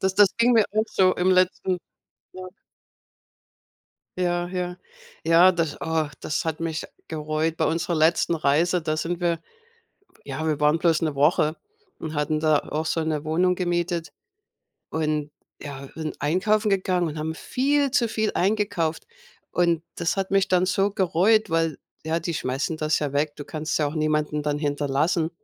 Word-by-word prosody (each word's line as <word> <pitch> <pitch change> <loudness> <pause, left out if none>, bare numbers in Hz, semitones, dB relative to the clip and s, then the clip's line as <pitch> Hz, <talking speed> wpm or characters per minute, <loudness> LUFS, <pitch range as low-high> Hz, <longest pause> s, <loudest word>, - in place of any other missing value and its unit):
Das 190 0 0
das 200 -1 +5
ging 240 +1 +4
mir 225 -3 +5
auch 215 +1 +2
so 185 -1 +3
im 180 +1 +2
letzten 185 0 +2 0.6
Ja. 185 0 -8 1.7
Ja, 175 -1 0
ja. 180 -1 -3 0.5
Ja, 170 +3 +6
das 165 -4 -2
oh, 160 -2 0
das 155 - -2
hat 160 -2 -2
mich 165 -1 -3 0.2
gereut. 155 +1 -2
Bei 160 - +1
unserer 170 +2 -1
letzten 165 +2 +3
Reise, 165 +4 +2
da 155 -1 -1
sind 170 +3 -3
wir 170 -1 +1 0.9
ja, 145 +3 -4
wir 155 -2 0
waren 150 +2 +3
bloß 165 -2 +2
'ne 155 -3 -1
Woche 150 +2 +3 0.4
und 155 -1 -6
hatten 155 +1 0
da 155 -1 +3
auch 155 +3 -4
so 165 +1 0
'ne 155 -2 -2
Wohnung 180 +4 +2
gemietet. 175 -1 -1 0.8
Und, 150 -2 -1 0.3
ja, 140 -2 -7
sind 155 -1 -5
einkaufen 210 +8 +1
gegangen 185 -3 +1
und 155 - -6
haben 160 +1 -3
viel 280 - 0
zu 245 -4 +2
viel 220 -1 0
eingekauft. 190 -5 0 0.5
Und 170 -2 +2
das 170 +3 -1
hat 190 -1 -1
mich 195 0 +2
dann 185 0 +3
so 195 +2 +1
gereut, 200 +2 +2
weil, 165 -2 0 0.3
ja, 160 +1 0
die 170 +1 -3
schmeißen 135 +3 -2
das 155 -1 +1
ja 145 -2 -3
weg. 145 +1 0
Du 145 - -7
kannst 155 0 -4
es - - +2
ja 150 - +1
auch 145 - -4
niemanden 150 -1 0
dann 145 0 -1
hinterlassen. 150 +3 0
165 Hz, 170 wpm, -24 LUFS, 155-185 Hz, 1.7 s, Ja